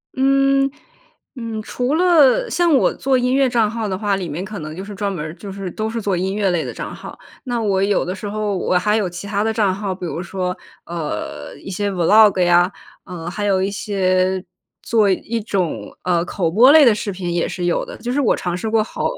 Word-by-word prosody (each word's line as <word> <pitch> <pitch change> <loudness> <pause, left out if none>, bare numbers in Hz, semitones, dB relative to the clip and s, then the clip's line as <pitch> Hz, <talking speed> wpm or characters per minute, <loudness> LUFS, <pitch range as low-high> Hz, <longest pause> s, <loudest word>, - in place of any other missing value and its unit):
嗯， 275 +1 +3 0.7
嗯， 230 -3 -5
除 250 +5 -2
了 350 - +4
像 340 -1 +2
我 265 - +3
做 265 -1 +1
音 250 +1 +1
乐 270 -2 +3
账 230 -3 +2
号 225 -1 -3
的 190 - -2
话， 205 0 0
里 185 -3 -4
面 165 +6 -4
可 210 0 -7
能 155 0 -7
就 190 - -6
是 205 0 -8
专 200 0 -2
门 160 -5 -4
儿 155 - -6
就 195 +3 -9
是 195 -1 -5
都 215 +4 -3
是 230 0 -3
做 200 -2 0
音 190 +2 -2
乐 205 -2 +1
类 170 -3 0
的 - - -5
账 - - -6
号。 - - -10 0.3
那 240 -3 -2
我 195 -2 +1
有 200 -2 +1
的 180 - -3
时 205 - -6
候 210 -1 -2
我 180 - +1
还 210 +4 +2
有 200 -4 0
其 175 +3 -8
他 205 0 0
的 225 - +1
账 205 -4 +2
号， 195 -1 -3
比 180 -1 -7
如 165 0 -4
说， 180 0 -3 0.3
呃， 175 - -5
一 - - -10
些 200 +2 -2
Vlog 195 +3 +5
呀， 175 +1 +4 0.3
呃， 175 -2 -6
还 205 +4 -3
有 190 -2 +2
一 195 - 0
些 190 -3 0 0.4
做 220 -3 +2
一 225 +4 -1
种， 195 -6 -3
呃， 175 -2 +1
口 175 -2 -1
播 235 +10 +6
类 310 -1 +8
的 230 -4 +5
视 205 -1 -3
频 180 -2 -4
也 170 - 0
是 180 - -4
有 175 - +1
的， - - -9
就 240 +2 -4
是 285 - +1
我 250 - +3
尝 175 -1 -3
试 220 +5 -3
过 220 -1 +2
好 - - -6
200 Hz, 265 characters per minute, -20 LUFS, 185-230 Hz, 0.7 s, 类